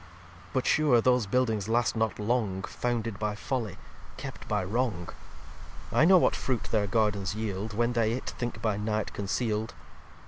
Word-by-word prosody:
xxviii 90 0 -20
"But 130 -2 0
sure 145 -6 +4
those 125 -2 +3
Buildings 110 -3 +1
last 120 +1 +2
not 110 -1 0
long, 105 -3 0
Founded 115 -3 -2
by 105 -1 -1
Folly, 115 -3 -3 0.4
kept - - -7
by 105 -2 0
Wrong. 100 -4 -1 0.8
I 155 - +5
know 185 +2 +8
what - - +3
Fruit 125 -4 -1
their 105 -2 +2
Gardens 105 -1 +1
yield, 105 -1 -3
When 120 +3 +1
they 115 -1 +2
it 130 - -4
think 120 -2 -5
by 105 -3 +1
Night 105 0 -2
conceal'd. 110 +2 -2
110 Hz, 165 wpm, -29 LUFS, 100-120 Hz, 0.8 s, know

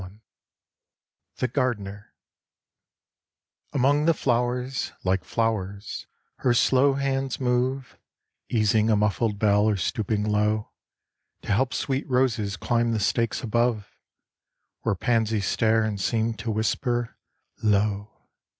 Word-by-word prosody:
171 95 0 -9 1.2
THE 125 -1 -2
GARDENER 105 -7 -2 1.6
Among 145 +2 +2
the 165 -1 +4
flowers, 125 +1 -1
like 95 0 +1
flowers, 105 -3 -2 0.3
her 120 -1 +2
slow 135 +3 +4
hands 135 -1 -1
move 130 +1 -1 0.5
Easing 110 -1 +2
a 110 - +4
muffled 105 +1 +1
bell 105 0 +3
or 105 - +1
stooping 105 +2 -1
low 105 0 0 0.7
To - - -4
help 125 +6 +2
sweet 135 +1 -2
roses 115 -6 +1
climb 120 +2 +1
the 110 - 0
stakes 115 +4 0
above, 115 -2 0 0.9
Where - - 0
pansies 110 0 0
stare 110 +3 +2
and 105 -3 -2
seem 115 +2 0
to 110 +1 -6
whisper 120 +2 -1 0.5
"Lo!" 105 0 +1
115 Hz, 115 wpm, -25 LUFS, 105-125 Hz, 1.6 s, the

